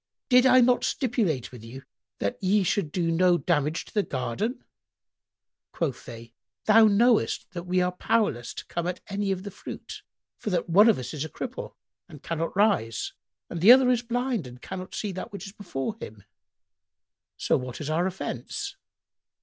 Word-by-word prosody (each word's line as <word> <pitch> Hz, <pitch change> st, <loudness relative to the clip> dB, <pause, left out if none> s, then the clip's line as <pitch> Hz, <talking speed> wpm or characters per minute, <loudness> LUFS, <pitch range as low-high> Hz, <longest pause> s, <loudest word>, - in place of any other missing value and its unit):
Did 250 Hz, 0 st, +6 dB
I 255 Hz, 0 st, +7 dB
not 245 Hz, 0 st, +3 dB
stipulate 215 Hz, -, 0 dB
with 120 Hz, -3 st, -11 dB
you 130 Hz, +4 st, -10 dB, 0.3 s
that 100 Hz, -, -2 dB
ye 195 Hz, +2 st, +3 dB
should 175 Hz, -3 st, 0 dB
do 170 Hz, -1 st, 0 dB
no 175 Hz, +1 st, +4 dB
damage 155 Hz, -2 st, 0 dB
in -, -, -16 dB
the 210 Hz, -, +3 dB
garden?" 140 Hz, -, -3 dB, 1.1 s
Quoth 140 Hz, -8 st, -3 dB
they, 115 Hz, -1 st, -10 dB, 0.3 s
"Thou 220 Hz, +1 st, +7 dB
knowest 225 Hz, +3 st, +2 dB
that 175 Hz, -2 st, -6 dB
we 180 Hz, 0 st, +2 dB
are 180 Hz, -, 0 dB
powerless 180 Hz, -, 0 dB
to -, -, -7 dB
come 170 Hz, 0 st, -3 dB
at 180 Hz, -, -3 dB
any 200 Hz, 0 st, -1 dB
of 190 Hz, -1 st, -3 dB
the 200 Hz, -, -6 dB
fruit, -, -, -9 dB, 0.4 s
for -, -, -3 dB
that 180 Hz, -2 st, 0 dB
one 205 Hz, +7 st, +6 dB
of 220 Hz, -, +4 dB
us 130 Hz, +3 st, -6 dB
is 150 Hz, -2 st, -3 dB
a 160 Hz, -, -5 dB
cripple 255 Hz, +8 st, -6 dB, 0.3 s
and 150 Hz, -4 st, -13 dB
cannot 165 Hz, +2 st, -3 dB
rise 190 Hz, -, +1 dB, 0.3 s
and 170 Hz, -, -6 dB
the 205 Hz, +7 st, +9 dB
other 255 Hz, 0 st, +7 dB
is 240 Hz, -2 st, +2 dB
blind 245 Hz, -, -2 dB
and 125 Hz, 0 st, -12 dB
cannot 185 Hz, 0 st, -7 dB
see 210 Hz, -, -3 dB
that 185 Hz, +5 st, -6 dB
which 200 Hz, 0 st, -7 dB
is 195 Hz, -, -9 dB
before 200 Hz, -2 st, -4 dB
him: 105 Hz, -2 st, -9 dB, 1.1 s
so -, -, +1 dB
what 125 Hz, -2 st, -4 dB
is 150 Hz, -, -5 dB
our 170 Hz, +4 st, +1 dB
offence?" 390 Hz, -, -5 dB
185 Hz, 180 wpm, -26 LUFS, 150-220 Hz, 1.1 s, the